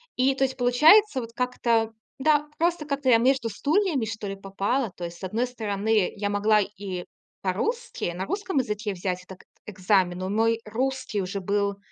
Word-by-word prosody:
И, 265 +2 +2
то 270 - 0
есть, 265 0 -1
получается, 295 - +5
вот 230 -1 -9
как-то 235 -2 0 0.3
да, 300 +1 +3
просто 335 -1 +1
как-то 280 -2 -1
я 235 - +7
между 250 0 +2
стульями, 295 - +1
что 210 -1 -5
ли, 195 - -4
попала. 195 +5 -2
То 175 - -8
есть, 170 0 -8
с - - -16
одной 225 +7 -1
стороны, 215 -3 0
я 205 0 -2
могла 210 +1 +3
и 195 -3 -5 0.4
по-русски, 215 - -2
на 185 +2 -3
русском 390 - -3
языке 210 -4 -2
взять 180 0 -3
так 190 -1 -12 0.2
экзамен. 185 -2 +1
Но 185 0 -3
мой 225 +2 +1
русский 250 0 -2
уже 195 +1 -4
был 200 +1 0
220 Hz, 175 wpm, -25 LUFS, 195-265 Hz, 0.4 s, я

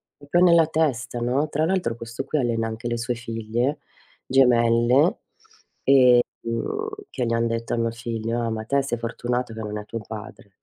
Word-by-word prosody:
proprio 175 +5 +2
nella 170 -2 +6
testa, 140 -7 -1
no. 130 +6 0
Tra 155 +2 0
l'altro 175 -10 0
questo 115 +3 -6
qui 155 - -1
allena 115 -3 0
anche 110 +2 -5
le 120 0 -1
sue 125 +1 -2
figlie 115 +4 -2 0.5
gemelle, 125 +3 +4 1.3
ehm, 265 - -3 0.2
che 125 - -2
gli 115 - 0
han 115 0 +1
detto 115 0 -2
a - - -1
mio 115 0 0
figlio: 115 0 -3
“Ah, 115 - -1
ma 110 -1 -3
te 140 +5 +1
sei 135 -3 -2
fortunato 120 +1 -3
che 110 - -7
non 105 -1 -4
è 105 - -5
tuo 115 +1 -6
padre”. 105 -2 -10
120 Hz, 180 wpm, -24 LUFS, 115-135 Hz, 1.3 s, nella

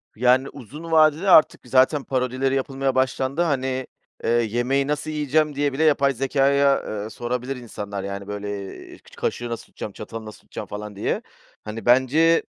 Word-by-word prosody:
Yani, 125 +3 +3
uzun 145 +6 -10
vadede 160 +3 +4
artık 155 -4 +6
zaten 135 +3 +3
parodileri 130 +1 0
yapılmaya 135 0 -1
başlandı. 130 +3 0
Hani, 130 -5 -1 0.4
eee, - - 0
yemeği 120 +4 +1
nasıl 150 +1 -2
yiyeceğim 150 0 +1
diye 145 -1 0
bile 155 +4 0
yapay 140 -3 +4
zekâya, 140 +2 +2 0.2
eee, 110 - -6
sorabilir 125 +3 -3
insanlar, 105 -5 -6
yani, 100 0 -5
böyle, 100 -1 -5
eee, - - -12
ç - - -19
kaşığı 120 0 -3
nasıl 115 - -5
tutacağım, 105 - -8
çatalı 110 +1 -8
nasıl 110 - -10
tutacağım - - -8
falan 105 0 -7
diye. 100 - -1 0.4
Hani, 105 0 -7
bence, 135 +7 +4
130 Hz, 160 wpm, -23 LUFS, 115-140 Hz, 0.4 s, artık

